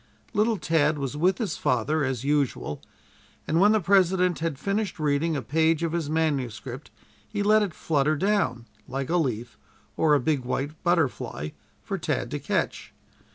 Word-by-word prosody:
Little 220 +1 +2
Tad 155 -3 +2
was 140 -1 -3
with 180 +5 +2
his 210 - -2
father, 145 +6 +1
as 130 -3 -2
usual, 140 - 0 0.7
and 160 - +2
when 205 +3 +6
the 220 - +4
President 185 -2 +3
had 160 -4 -2
finished 200 +5 -2
reading 155 +1 +1
a 135 - -2
page 160 +6 +2
of 165 - 0
his 165 -3 -2
manuscript 135 -5 -2 0.4
he 205 -2 -2
let 215 +1 +5
it 200 -5 -2
flutter 155 -1 +1
down, 190 - 0 0.2
like 135 +3 -3
a 175 - +3
leaf, 120 -7 -2 0.4
or 150 -2 +4
a - - +3
big 140 0 0
white 135 +3 -2
butterfly, 145 - 0 0.3
for - - -3
Tad - - -2
to - - -2
catch. - - -2
155 Hz, 165 wpm, -26 LUFS, 135-180 Hz, 0.7 s, when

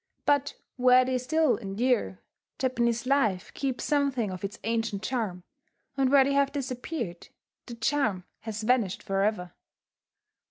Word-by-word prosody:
But 285 -1 +2 0.2
where 255 0 +6
they 255 0 0
still 315 +2 +2
endure, 210 - 0 0.4
Japanese 235 -2 0
life 230 -9 +1
keeps 265 -3 -3
something 275 -8 +1
of 185 0 -7
its 200 +1 -4
ancient 225 -2 -1
charm; 215 -9 -2 0.5
and 270 -1 +2
where 280 -1 +7
they 280 +1 0
have 280 0 +2
disappeared, 255 - -4 0.4
that 235 -2 -9
charm 230 -8 +1 0.2
has 220 -1 -5
vanished 225 -5 +1
forever. 195 -2 -1
245 Hz, 130 wpm, -28 LUFS, 210-270 Hz, 0.5 s, where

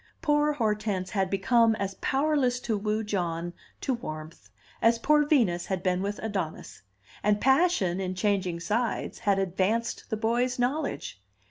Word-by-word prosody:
Poor 295 -1 +3
Hortense 210 -6 -1
had 195 -3 0
become 225 +4 +3
as 200 -2 -3
powerless 270 -3 +1
to 225 -3 -1
woo 210 +1 -1
John 175 -4 -2 0.3
to 265 - 0
warmth 155 - -7 0.3
as 230 0 +4
poor 295 +4 +3
Venus 200 - +2
had 190 -2 -2
been 185 0 +1
with 200 +1 -2
Adonis; 185 - -4 0.4
and 210 0 +2
passion, 265 - +3
in 185 -1 -3
changing 185 -3 0
sides, 225 +6 -1
had 200 -2 +2
advanced 195 +5 -1
the 220 - -1
boy's 240 +3 0
knowledge. 255 - -2
210 Hz, 145 wpm, -27 LUFS, 185-245 Hz, 0.4 s, as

